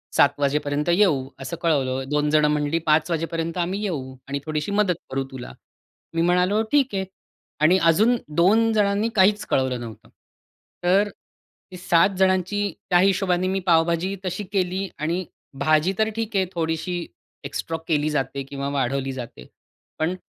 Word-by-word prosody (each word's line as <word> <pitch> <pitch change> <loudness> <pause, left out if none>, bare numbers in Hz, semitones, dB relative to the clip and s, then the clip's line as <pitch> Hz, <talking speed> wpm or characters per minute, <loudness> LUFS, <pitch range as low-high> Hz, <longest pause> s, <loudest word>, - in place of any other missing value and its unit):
7 - - +4
वाजेपर्यंत 145 +2 0
येऊ", 170 -9 +3
असं 140 +5 -5
कळवलं. 135 -5 +1
2 150 0 +1
जणं 150 0 +4
म्हणाली, 150 +2 0
"5 155 +3 +3
वाजेपर्यंत 165 +1 -2
आम्ही 190 +4 -3
येऊ 135 -10 -4
आणि 140 +1 -3
थोडीशी 155 +4 -2
मदत 200 -3 +2
करू 135 0 -1
तुला". 130 -2 -8 0.6
मी 165 - 0
म्हणालो, 180 +5 +2
"ठीक 275 -6 +2
आहे". 190 0 -1 0.6
आणि 170 +4 +5
अजून 220 +9 +4 0.2
2 220 +6 +4
जणांनी 205 +1 +2
काहीच 205 +1 +4
कळवलं 130 -2 +1
नव्हतं. 115 -3 -10 0.7
तर 195 +4 +3 0.7
7 175 +1 +4
जणांची 190 +1 +2 0.3
त्या 175 -2 +5
हिशोबाने 185 -1 +2
मी 190 +1 0
पावभाजी 170 +3 +2
तशी 185 +3 -3
केली 190 0 0
आणि 170 +4 -1 0.3
भाजी 155 +5 +2
तर 220 0 +3
ठीक 225 -1 -3
आहे, 190 - +3
थोडीशी 165 +1 -2 0.4
एक्स्ट्रॉ 165 +3 -4
केली 155 -2 +1
जाते 140 -1 -2
किंवा 140 0 -5
वाढवली 135 -1 -1
जाते, 120 - -8 0.5
पण 165 +4 0
170 Hz, 150 wpm, -23 LUFS, 145-190 Hz, 0.7 s, आणि